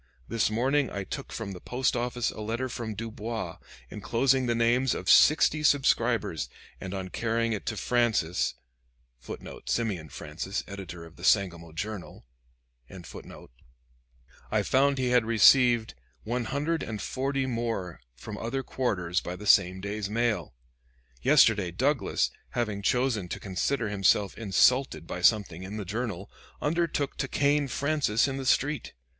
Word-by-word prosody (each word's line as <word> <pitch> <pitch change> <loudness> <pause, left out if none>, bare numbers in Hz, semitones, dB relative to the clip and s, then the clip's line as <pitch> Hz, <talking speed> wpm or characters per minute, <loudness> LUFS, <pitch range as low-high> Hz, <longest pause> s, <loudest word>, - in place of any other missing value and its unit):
This 115 -2 +1
morning 130 +5 +1
I 100 - -4
took 140 +7 -7
from 110 -4 -5
the 90 -2 -9
post 130 +1 0
office 120 0 -1
a - - -8
letter 115 +4 -2
from 115 -2 -5
Dubois, 115 +1 -5 0.3
inclosing 125 +5 +1
the 120 - +1
names 120 +2 +2
of 90 - -6
sixty 155 0 +5
subscribers, 120 - +2 0.3
and 95 +1 -6
on 95 -1 -5
carrying 115 +2 0
it 105 - -5
to 110 - -2
Francis 110 -6 +1 0.6
[Simeon 90 - -4
Francis, 75 +8 -5
editor 90 -4 -8
of 80 0 -16
the 85 - -13
'Sangamo 85 -5 +2
Journal'] 100 - -6 2.2
I - - +1
found 140 +1 +2
he 130 -1 0
had 125 -1 +4
received 115 +1 +5 0.3
one 120 +2 -2
hundred 150 +6 -1
and 110 -2 -5
forty 135 +5 -2
more 115 -8 -3
from 105 - -8
other 125 +4 -3
quarters 90 -11 -1
by 90 - -5
the 105 - -9
same 95 -1 +4
day's 100 0 -4
mail.... 115 - -1 0.7
Yesterday 100 - +4
Douglas, 125 - 0 0.3
having 105 -4 -1
chosen 120 -4 0
to - - -4
consider 110 +5 -1
himself 100 0 +2
insulted 110 - +2
by 90 - -5
something 100 -4 +2
in 95 +3 -6
the 105 - -5
'Journal,' 105 -2 -4 0.3
undertook 155 -2 -1
to 135 - -1
cane 145 +1 +2
Francis 140 -4 +1
in 135 -1 -3
the 135 -1 -4
street. 145 +3 +1
115 Hz, 140 wpm, -28 LUFS, 95-130 Hz, 2.2 s, sixty